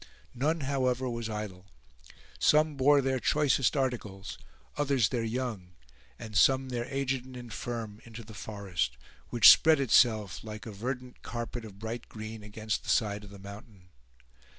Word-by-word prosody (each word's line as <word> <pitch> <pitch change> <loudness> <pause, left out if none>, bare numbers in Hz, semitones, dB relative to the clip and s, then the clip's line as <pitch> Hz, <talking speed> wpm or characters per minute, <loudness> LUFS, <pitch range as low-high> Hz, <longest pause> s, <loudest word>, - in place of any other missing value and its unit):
None, 155 +6 0
however, 130 -2 0
was 115 -2 -3
idle. 105 -4 -6 0.7
Some 155 0 +4
bore 140 +1 +5
their 130 -1 0
choicest 145 0 +2
articles, 110 -7 -3 0.4
others 135 -7 +2
their 120 -2 -1
young, 110 -6 -4 0.4
and 110 -1 -9
some 130 +4 +4
their 120 -1 -2
aged 135 -1 -2
and 130 -1 -11
infirm, 115 -3 -6
into 115 0 -10
the 110 0 -12
forest, 95 - -3 0.3
which 120 -4 +9
spread 160 -2 +5
itself 110 -6 +3
like 110 -1 -8
a 115 - -6
verdant 125 +4 -5
carpet 120 0 -5
of 100 -3 -11
bright 115 +3 -6
green 110 0 -7
against 105 +1 -3
the - - -9
side 105 -2 +1
of 105 - -11
the 100 - -11
mountain. 100 -1 -12
115 Hz, 150 wpm, -30 LUFS, 105-130 Hz, 0.7 s, which